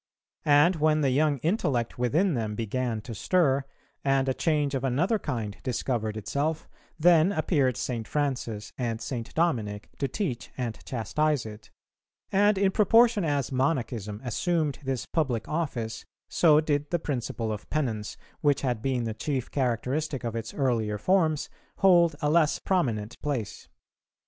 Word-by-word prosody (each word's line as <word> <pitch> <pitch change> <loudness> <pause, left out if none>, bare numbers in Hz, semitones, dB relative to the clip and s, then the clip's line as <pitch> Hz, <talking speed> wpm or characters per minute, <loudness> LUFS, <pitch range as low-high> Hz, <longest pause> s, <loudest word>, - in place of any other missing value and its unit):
And 150 +5 +5
when 155 0 +3
the 135 -2 +2
young 145 +2 +2
intellect 145 - 0
within 160 - +2
them 110 -4 -2
began 115 +1 -2
to 115 - -8
stir, 140 - +2 0.4
and 135 -1 +2
a 130 - +2
change 150 -1 0
of 135 -1 -2
another 165 - +1
kind 115 - -3
discovered 115 -3 -2
itself, 145 +9 -2 0.3
then 170 +2 +5
appeared 145 - +1
St. 115 -3 -3
Francis 125 -8 -2
and 115 -3 -1
St. 115 0 -5
Dominic 110 -12 0
to 140 - +1
teach 135 - -3
and 120 -4 -4
chastise 135 +3 0
it; 105 0 -10 0.6
and 205 +1 +4
in 195 0 +3
proportion 225 +1 +4
as 145 -4 0
Monachism 125 -6 -1
assumed 150 - -1
this 130 -2 -2
public 130 -9 -1
office, 120 -9 -3 0.2
so 155 -3 +5
did 150 -1 0
the 175 - +1
principle 120 -7 -3
of 105 -1 -6
penance, 115 -9 -2 0.2
which 145 -2 +2
had 125 -5 -1
been 130 -1 0
the 115 -1 -2
chief 130 +3 -3
characteristic 130 +2 -1
of 115 -1 -3
its 115 - -4
earlier 115 -6 0
forms, 160 - +2 0.3
hold 175 -4 +5
a 145 - +3
less 155 -2 +3
prominent 120 - -1
place. 135 -8 -3
135 Hz, 150 wpm, -27 LUFS, 115-155 Hz, 0.6 s, And